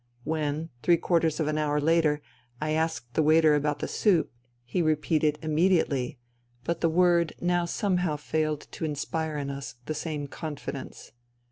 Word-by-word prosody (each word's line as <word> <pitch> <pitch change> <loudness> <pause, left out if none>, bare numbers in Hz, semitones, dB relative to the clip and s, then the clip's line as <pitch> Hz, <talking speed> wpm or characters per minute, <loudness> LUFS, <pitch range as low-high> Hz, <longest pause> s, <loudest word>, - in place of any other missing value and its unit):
When, 155 +1 -2
three 170 -1 +4
quarters 165 -2 +1
of 155 - +1
an 155 0 0
hour 150 -1 +1
later, 150 -1 +2 0.4
I 155 +2 -1
asked 160 -6 -1
the - - +2
waiter 155 0 +5
about 150 0 +1
the - - -3
soup, 185 -7 +2 0.3
he 150 +9 -1
repeated 155 -1 +2
" - - -25
Immediately," 155 -5 +1 0.5
but 170 +6 -2
the 165 - +3
word 170 0 +3
now 175 0 +1
somehow 180 -3 0
failed 155 0 -1
to - - -7
inspire 155 +1 -2
in 140 -1 -3
us 140 -2 -6
the 155 - -2
same 150 -1 -3
confidence. 140 -2 -7
155 Hz, 160 wpm, -27 LUFS, 150-165 Hz, 0.5 s, waiter